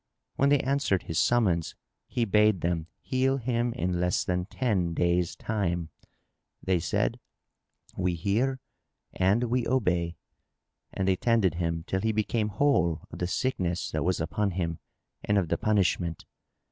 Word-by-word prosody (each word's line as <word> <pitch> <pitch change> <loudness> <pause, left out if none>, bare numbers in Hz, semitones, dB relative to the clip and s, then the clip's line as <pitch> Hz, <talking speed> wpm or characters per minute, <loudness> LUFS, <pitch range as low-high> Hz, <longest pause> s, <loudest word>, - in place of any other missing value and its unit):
When 140 - +3
they 145 -1 +4
answered 135 - +1
his 80 - -2
summons, 95 -9 +2 0.3
he 120 - 0
bade 105 -2 +3
them 85 -2 -1
heal 135 +1 +1
him 120 -1 0
in 90 -7 -1
less 90 0 +1
than 90 0 -1
ten 95 -10 0
days' 85 0 +1
time: 90 -6 -2 0.7
they 95 -2 +2
said, - - 0 0.8
"We 90 -1 0
hear 115 +10 0 0.5
and 100 +6 +2
we 120 0 0
obey," 90 -9 +1 0.8
and 95 - -2
they 95 -1 +3
tended 115 -7 +2
him 85 -1 -2
till 95 +1 -1
he 110 +1 +1
became 110 0 0
whole 95 - +2
of - - -8
the 90 - -1
sickness 90 -6 -1
that - - -1
was 90 0 +1
upon 100 +6 0
him 85 -3 -2 0.4
and 105 - +1
of 90 -5 +1
the - - +1
punishment. 90 -5 +1
95 Hz, 150 wpm, -28 LUFS, 85-115 Hz, 0.8 s, they